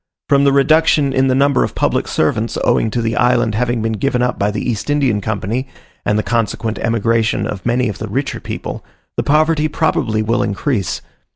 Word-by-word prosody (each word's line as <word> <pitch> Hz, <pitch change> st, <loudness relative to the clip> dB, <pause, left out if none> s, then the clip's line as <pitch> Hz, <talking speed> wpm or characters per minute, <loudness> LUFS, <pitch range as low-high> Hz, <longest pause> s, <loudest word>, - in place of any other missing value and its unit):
From 140 Hz, 0 st, +3 dB
the 140 Hz, -, +5 dB
reduction 145 Hz, 0 st, +3 dB
in 130 Hz, 0 st, +2 dB
the 130 Hz, -, +2 dB
number 140 Hz, 0 st, +3 dB
of -, -, -4 dB
public -, -, 0 dB
servants 110 Hz, +9 st, 0 dB
owing 115 Hz, -, +2 dB
to 120 Hz, +1 st, -2 dB
the 115 Hz, 0 st, -1 dB
island 120 Hz, -3 st, +2 dB
having 120 Hz, 0 st, 0 dB
been 115 Hz, 0 st, 0 dB
given 125 Hz, +2 st, 0 dB
up 125 Hz, -, -1 dB
by 100 Hz, -, +1 dB
the 105 Hz, +3 st, -3 dB
East 115 Hz, +2 st, -3 dB
Indian 135 Hz, -8 st, +1 dB
Company, 110 Hz, +5 st, -2 dB, 0.4 s
and 105 Hz, -, +2 dB
the 110 Hz, -, 0 dB
consequent 115 Hz, -1 st, -1 dB
emigration 115 Hz, 0 st, +1 dB
of 100 Hz, +2 st, -5 dB
many 125 Hz, +1 st, +1 dB
of 105 Hz, -, -5 dB
the 110 Hz, -, -4 dB
richer 135 Hz, +7 st, -2 dB
people, -, -, -6 dB, 0.3 s
the -, -, 0 dB
poverty 155 Hz, +1 st, +2 dB
probably 125 Hz, -8 st, 0 dB
will 115 Hz, +3 st, +1 dB
increase. 105 Hz, -, -1 dB
120 Hz, 195 wpm, -17 LUFS, 110-140 Hz, 0.4 s, the